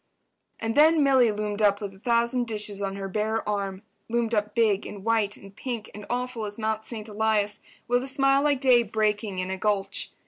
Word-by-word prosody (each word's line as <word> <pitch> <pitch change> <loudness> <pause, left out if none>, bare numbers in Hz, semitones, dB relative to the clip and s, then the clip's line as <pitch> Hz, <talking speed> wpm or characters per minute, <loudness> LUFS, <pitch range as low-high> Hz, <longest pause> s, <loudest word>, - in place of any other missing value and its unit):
And 225 0 -2
then 310 +3 +5
Milly 260 -4 +5
loomed 210 0 -3
up 205 -1 +4
with 200 -2 -6
a 190 - -17
thousand 235 +2 +1
dishes 210 -2 -3
on 195 -1 -2
her 195 -1 -4
bare 215 +3 -1
arm—loomed 210 +3 -3
up 210 -1 0
big 215 -4 +3
and 200 -1 -9
white 220 -3 +1
and 195 0 -14
pink 235 -2 -5
and 210 -1 -9
awful 245 -2 -2
as 205 0 -4
Mount 220 -1 -1
Saint 220 -1 -6
Elias—with 215 +3 -1
a 265 - -5
smile 275 +1 +3
like 285 -2 +1
day 255 -3 +6
breaking 210 -2 -1
in 185 +1 -2
a 190 - -3
gulch. 205 -2 -1
215 Hz, 195 wpm, -26 LUFS, 205-235 Hz, -, day